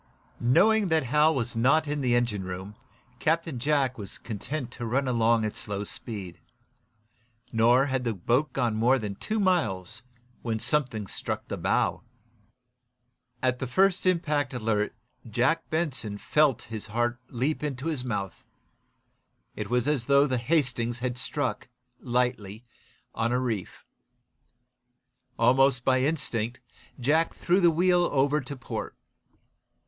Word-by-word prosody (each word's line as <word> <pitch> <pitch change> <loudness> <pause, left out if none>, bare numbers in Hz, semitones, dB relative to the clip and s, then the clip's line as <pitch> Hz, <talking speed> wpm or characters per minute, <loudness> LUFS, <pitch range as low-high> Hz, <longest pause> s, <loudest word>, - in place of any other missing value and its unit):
Knowing 195 - +4
that 160 -3 +2
Hal 150 +5 +3
was 120 -2 -2
not 145 +7 +3
in 145 0 -2
the 125 -2 +2
engine 120 -5 0
room, 95 +2 -6 0.5
Captain 160 -4 0
Jack 135 -2 +1
was 100 -2 -8
content 125 +5 -5
to - - -8
run 135 +4 0
along 115 -2 +2
at 105 - -3
slow 105 -1 -4
speed. 100 -4 -6 1.1
Nor 120 +4 +5
had 130 -2 -1
the 115 -3 -1
boat 120 - +1
gone 120 -4 0
more 120 +5 +3
than 105 -5 -4
two 215 - -3
miles 115 - 0 0.4
when 115 -2 -2
something 120 -3 0
struck - - -4
the - - -2
bow. - - 0 1.4
At 125 -1 +1
the 130 - -3
first 190 +7 +2
impact 150 -7 +1
alert 110 -3 -1 0.3
Jack 130 +9 +1
Benson 135 -10 -2
felt 150 +2 +2
his 110 -1 -6
heart 120 +2 -1
leap 135 +5 -1
into 140 -2 -4
his 155 -6 -2
mouth. 105 -6 -4 1.1
It 105 -1 -5
was 125 +2 +1
as 145 -5 0
though 140 +1 +5
the 130 -3 0
"Hastings" 125 -4 0
had 125 0 -2
struck, 125 -3 -2 0.3
lightly, 120 -3 -1 0.5
on 115 +1 0
a 125 - +2
reef. 115 -7 -4 1.5
Almost 130 -1 +4
by 130 -1 +3
instinct 125 -5 -1 0.4
Jack 155 +6 +2
threw 180 +2 +2
the 175 -3 +6
wheel 175 +2 +3
over 145 +2 +2
to 140 +2 -7
port. 125 - -6
125 Hz, 140 wpm, -27 LUFS, 115-150 Hz, 1.5 s, the